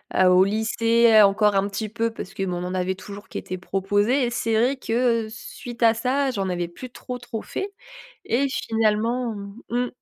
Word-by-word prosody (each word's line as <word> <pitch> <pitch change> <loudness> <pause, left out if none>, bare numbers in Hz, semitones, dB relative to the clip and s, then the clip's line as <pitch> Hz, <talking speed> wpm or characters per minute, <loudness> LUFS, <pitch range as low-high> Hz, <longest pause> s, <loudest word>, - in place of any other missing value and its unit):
heu. 185 - +5
Au 180 +1 +6
lycée 225 +1 +4
encore 205 +1 +4
un 195 +1 +2
petit 215 +2 -3
peu 230 +1 -1
parce 195 -3 -8
qu'on 190 -2 -2
en 180 - -4
avait 185 +1 -1
toujours 200 +3 -10
qui - - -6
était 185 - -6
proposé 205 +8 +1
et 240 - -2
c'est 225 -1 0
vrai 250 +5 +2
que, 230 -2 +1
suite 240 +1 -7
à 225 0 +6
ça, 265 +4 0
j'en 195 -4 -2
avais 175 -1 -2
plus 250 +9 -9
trop, 250 -1 -7
trop 235 -2 -6
fait 395 +1 -4 0.5
et 270 +4 +1
finalement 225 +1 0 0.3
Mmh. 245 +1 0
225 Hz, 185 wpm, -24 LUFS, 200-240 Hz, 0.5 s, Au